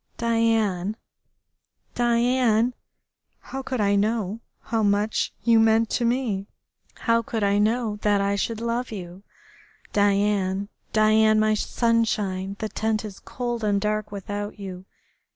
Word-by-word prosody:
Diane, 225 -4 +1 1.0
Diane, 240 0 +2 0.7
how 270 - -6
could 260 -2 -4
I 200 -1 +2
know 215 0 0 0.2
how 225 0 -1
much 205 +1 +1
you 230 -1 +5
meant 225 0 +3
to 240 - 0
me? 230 -5 -1 0.5
How 230 -1 +3
could 225 -1 -3
I 200 0 +2
know 220 0 +1
that 205 -1 +2
I 200 0 +1
should 225 +3 -2
love 235 +1 -2
you?... 180 -2 -8 0.7
Diane, 200 -1 +1 0.2
Diane, 215 0 +4
my 215 0 +3
sunshine. 210 -4 0
The 215 - -3
tent 220 +1 -1
is 200 -2 -8
cold 240 -2 -4
and 205 -1 +2
dark 210 0 -2
without 205 +1 -5
you.... 190 -2 -8
215 Hz, 130 wpm, -24 LUFS, 200-230 Hz, 1.0 s, you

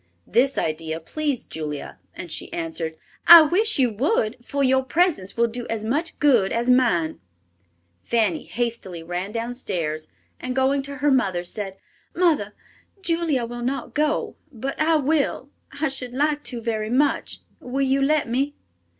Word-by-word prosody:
This 265 +3 +2
idea 160 0 -2
pleased 285 - -3
Julia, 150 -2 -5 0.2
and 170 - -7
she - - -5
answered, 165 -1 -4 0.3
"I 335 -1 +12
wish 415 +8 +3
you 255 -4 +3
would, 240 - +1
for 280 +2 -1
your 265 0 +3
presence 295 - 0
will 235 - +4
do 235 +1 -5
as 220 -1 -2
much 300 +9 -2
good 245 -10 +4
as 235 +2 +1
mine." 230 -11 +2 0.8
Fanny 215 -8 0
hastily 225 -8 -3
ran 180 +4 -4
down 230 +2 -3
stairs 165 -10 -3 0.3
and, 255 0 -4
going 270 +1 +2
to 280 +1 -7
her 290 - +5
mother, 190 -9 +1
said, 195 +1 -5 0.4
"Mother, 310 - +1 0.5
Julia 330 -8 0
will 240 +1 -7
not 260 +3 -3
go, 300 0 0
but 265 +2 -4
I 320 +1 +4
will. 285 -2 0 0.3
I 315 - +2
should 255 -2 -6
like 295 +2 +1
to 240 -3 -3
very 220 -2 -2
much. 280 +5 0 0.2
Will 265 +2 -2
you 270 +1 +2
let 300 0 +2
me?" 270 +5 -1
250 Hz, 160 wpm, -23 LUFS, 205-285 Hz, 0.8 s, I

